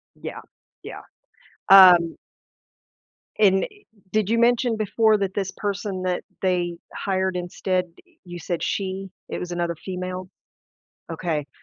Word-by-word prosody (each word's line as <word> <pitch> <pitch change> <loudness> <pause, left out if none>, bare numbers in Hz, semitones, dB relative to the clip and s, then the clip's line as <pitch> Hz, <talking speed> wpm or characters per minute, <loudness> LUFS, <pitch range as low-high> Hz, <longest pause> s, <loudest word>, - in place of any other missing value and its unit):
Yeah, - - -7 0.4
yeah. - - -9 0.7
Um 180 -4 +8 1.2
and, 195 -2 +4
i - - -6 0.4
did 215 -2 +1
you 230 +1 +2
mention 240 -1 +3
before 215 +1 +2
that 195 -1 -2
this 195 -2 -2
person 200 -2 -3
that 180 -1 -2 0.2
they 175 -2 0 0.2
hired 190 -1 -1
instead, 180 +1 -1 0.4
you 175 -1 -8
said 175 -1 -3
she 195 0 -3 0.2
it - - -4
was 180 0 -5
another 170 -1 -2
female? 185 +1 -6 0.8
Okay. 155 -5 -3
185 Hz, 125 wpm, -23 LUFS, 175-200 Hz, 1.2 s, Um